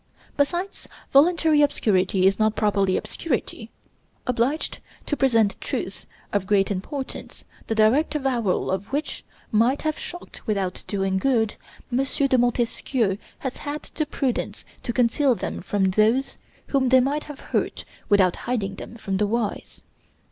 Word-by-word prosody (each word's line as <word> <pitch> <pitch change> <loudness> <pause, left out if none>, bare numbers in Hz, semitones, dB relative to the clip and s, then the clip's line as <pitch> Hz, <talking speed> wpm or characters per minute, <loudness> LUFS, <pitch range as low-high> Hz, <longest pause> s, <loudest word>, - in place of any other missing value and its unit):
Besides, 345 +7 -1 0.3
voluntary 315 +1 +5
obscurity 190 -9 +2
is 195 +2 +3
not 215 0 +2
properly 200 -3 +2
obscurity. 240 -6 -3 0.6
Obliged 250 +5 0 0.3
to 295 - -1
present 230 -7 +2
truths - - -4 0.3
of 200 -2 0
great 200 -1 +3
importance, 260 +8 -5 0.2
the 225 - -1
direct 235 +9 +3
avowal 245 -12 0
of 190 +3 -3
which 290 +3 -3 0.3
might 235 +6 +3
have 310 -1 -1
shocked 350 0 -9
without 195 -4 -1
doing 195 -1 0
good, 225 -3 +2 0.4
M. 260 +2 +3
de 275 0 +1
Montesquieu 240 -3 0 0.2
has 260 -2 -4
had 295 +1 -5
the 310 - -1
prudence 270 -4 -2 0.2
to - - -3
conceal 250 +3 +3
them - - -4
from 190 -2 +1
those 220 +7 +2 0.3
whom 265 -2 +2
they 260 0 +7
might 280 +4 0
have 295 -2 -9
hurt - - -1 0.2
without 190 -4 +4
hiding 200 -6 -1
them - - -9
from 205 -4 -3
the 210 +1 +2
wise. 225 -1 -3
235 Hz, 140 wpm, -24 LUFS, 205-275 Hz, 0.6 s, they